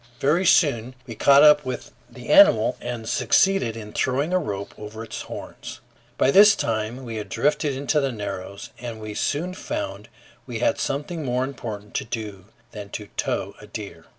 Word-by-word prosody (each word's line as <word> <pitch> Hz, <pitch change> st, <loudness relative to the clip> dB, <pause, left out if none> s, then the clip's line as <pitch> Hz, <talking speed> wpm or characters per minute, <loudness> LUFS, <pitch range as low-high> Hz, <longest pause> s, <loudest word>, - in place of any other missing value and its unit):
Very 170 Hz, +7 st, +2 dB
soon 125 Hz, -7 st, +3 dB
we 115 Hz, -, -7 dB
caught 140 Hz, +5 st, +6 dB
up 150 Hz, -1 st, +7 dB
with 130 Hz, -2 st, -5 dB, 0.2 s
the 120 Hz, 0 st, -11 dB
animal 125 Hz, -, +6 dB
and 120 Hz, -2 st, -5 dB
succeeded 190 Hz, -, +2 dB
in 105 Hz, -1 st, -9 dB
throwing 140 Hz, +7 st, 0 dB
a 185 Hz, -, +4 dB
rope 100 Hz, -, -5 dB
over 110 Hz, +1 st, -8 dB
its 115 Hz, -, -6 dB
horns. -, -, -8 dB, 0.4 s
By 135 Hz, -, +3 dB
this 205 Hz, +5 st, +8 dB
time 115 Hz, +3 st, -3 dB
we 115 Hz, -2 st, -5 dB
had 105 Hz, -2 st, -6 dB
drifted 150 Hz, +4 st, 0 dB
into 140 Hz, +3 st, 0 dB
the 135 Hz, -2 st, 0 dB
Narrows, 100 Hz, -3 st, -6 dB
and 120 Hz, -2 st, -6 dB
we 110 Hz, -1 st, -6 dB
soon 160 Hz, +11 st, -1 dB
found 300 Hz, +10 st, -5 dB, 0.4 s
we -, -, -4 dB
had 295 Hz, -1 st, +1 dB
something 150 Hz, +4 st, -3 dB
more 125 Hz, -1 st, 0 dB
important 110 Hz, -6 st, -7 dB
to -, -, -1 dB
do 105 Hz, -5 st, -6 dB, 0.3 s
than 105 Hz, -2 st, -8 dB
to 105 Hz, 0 st, -7 dB
tow -, -, -2 dB
a -, -, -12 dB
deer. -, -, -8 dB
125 Hz, 180 wpm, -23 LUFS, 110-150 Hz, 0.4 s, this